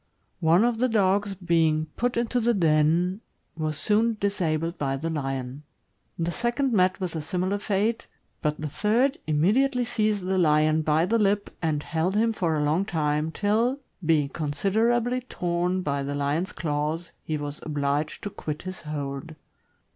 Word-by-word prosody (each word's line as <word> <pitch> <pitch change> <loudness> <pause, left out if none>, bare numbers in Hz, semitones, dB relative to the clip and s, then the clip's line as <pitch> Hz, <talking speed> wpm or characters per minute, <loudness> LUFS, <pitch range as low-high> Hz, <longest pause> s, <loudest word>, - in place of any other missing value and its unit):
One 170 +4 +4
of 240 -1 +1
the 255 +1 +2
dogs 200 -2 +2
being 165 -4 +2
put 245 0 0
into 240 +1 +1
the 235 0 +2
den, 170 +3 +2 0.3
was 155 -2 -2
soon 220 +6 +2
disabled 170 -4 -1
by 135 -1 -1
the 165 +4 -3
lion; 135 -2 -3 0.6
the 170 +1 -1
second 240 +5 0
met 185 -2 +3
with 180 -3 -3
a 160 - -2
similar 185 +5 -1
fate, 210 +3 0 0.3
but 150 -1 -1
the 155 - -3
third 225 - +1
immedi 195 - +3
ately 250 -3 -1
seized 215 -4 0
the 190 0 +1
lion 155 -1 +3
by 155 +2 +2
the 230 +5 +1
lip 205 0 +1
and 155 -3 0
held 170 +4 -1
him 225 +2 +3
for 170 -6 0
a 150 - +1
long 155 +6 +2
time, 155 -3 -1
till, 225 +8 +1 0.2
being 155 -3 +2
considerably 225 - 0
torn 180 -5 -1
by 140 -2 -1
the 140 +1 -3
lion's 145 +6 -1
claws, 155 +2 -2
he 155 - -3
was 145 0 -5
obliged 145 0 -2
to 205 - -4
quit 150 -3 -5
his 185 0 -6
hold. 150 0 -5
170 Hz, 165 wpm, -26 LUFS, 150-210 Hz, 0.6 s, One